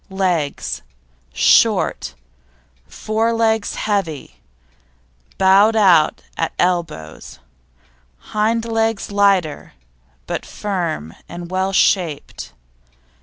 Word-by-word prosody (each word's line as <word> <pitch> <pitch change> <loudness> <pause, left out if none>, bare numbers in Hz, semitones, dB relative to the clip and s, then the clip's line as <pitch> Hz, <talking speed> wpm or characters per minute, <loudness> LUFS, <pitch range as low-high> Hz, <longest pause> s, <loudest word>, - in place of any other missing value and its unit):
LEGS 180 -7 -2 0.5
Short; 65 +1 +2 0.7
fore 220 - -1
legs 225 -2 0
heavy, 195 -8 -3 1.0
bowed 195 +4 +5
out 180 -8 +4
at 165 - -2
elbows; 170 - -2 0.9
hind 225 +2 0
legs 225 -2 -1
lighter, 195 -6 +1 0.5
but - - -4
firm 170 - -4 0.2
and 175 0 -8
well 190 +1 0
shaped. 170 - 0
190 Hz, 75 wpm, -19 LUFS, 165-215 Hz, 1.0 s, bowed